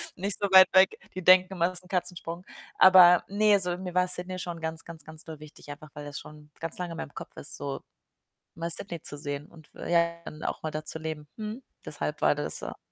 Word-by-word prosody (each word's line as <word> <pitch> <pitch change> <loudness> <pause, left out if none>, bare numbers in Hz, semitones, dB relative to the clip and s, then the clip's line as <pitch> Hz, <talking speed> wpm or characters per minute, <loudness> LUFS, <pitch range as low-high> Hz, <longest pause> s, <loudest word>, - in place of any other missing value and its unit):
nicht 195 +2 -3
so 200 - 0
weit 190 -1 +9
weg. 190 0 +5 0.2
Die 185 - -5
denken 185 +1 +6
immer, 170 -2 +1
das 180 -1 -3
ist 180 - -23
'n - - -16
Katzensprung. 180 -1 -3 0.3
Aber 180 -2 +8
ne, 205 0 +3
so 180 -2 0
mir 180 -1 -7
war 180 0 +3
Sydney 180 +1 0
schon 170 -2 -5
ganz, 160 0 -5
ganz, 165 -3 -10
ganz 160 +1 -4
doll 160 -2 -9
wichtig, 150 -1 -13
einfach 150 +1 -11
weil 145 0 -7
das 145 -1 -5
schon 150 0 -14
ganz 165 0 -4
lange 180 -2 -4
in - - -8
meinem 160 -3 -7
Kopf - - -9
ist, - - -4
so 140 -1 -5 0.7
mal 170 +1 -4
Sydney 170 -1 -6
zu 145 - -3
sehen 145 +1 -5
und 160 -3 -18
f - - -7
ja 170 0 +2
dann 155 - -8
auch - - -3
mal 155 - -3
da 155 0 -5
zu 160 - -5
leben. 155 -1 -6
Mhm. 220 +4 -6 0.2
Deshalb - - -4
war - - +4
das - - -3
so. - - -7
170 Hz, 240 wpm, -28 LUFS, 155-185 Hz, 0.7 s, weit